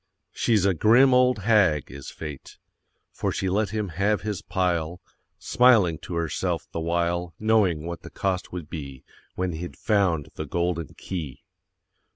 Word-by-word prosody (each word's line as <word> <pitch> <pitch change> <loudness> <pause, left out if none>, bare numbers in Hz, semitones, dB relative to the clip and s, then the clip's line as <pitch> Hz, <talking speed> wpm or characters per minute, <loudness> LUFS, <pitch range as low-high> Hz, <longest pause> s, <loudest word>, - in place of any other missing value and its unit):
She's 110 -5 +1
a 100 - +3
grim 120 - +5
old 125 -1 +4
hag, 95 -9 +3
is 70 -1 -8
Fate, 75 -4 -9 0.5
For - - -2
she 95 - -2
let 100 +2 +1
him 105 -1 -3
have 100 +5 0
his 105 -3 -3
pile, 90 -2 -1 0.4
Smiling 110 -11 +4
to 90 - -7
herself 85 -2 -2
the - - -4
while, 85 0 -1
Knowing 105 -8 +2
what 85 0 -5
the - - -10
cost 95 -2 -2
would 90 -4 -6
be, 70 -5 -8 0.3
When 90 -1 -1
he'd 85 +2 -7
found 90 -8 +1
the 80 - -6
Golden 85 +2 -2
Key. 75 -8 -6
90 Hz, 155 wpm, -25 LUFS, 80-105 Hz, 0.5 s, grim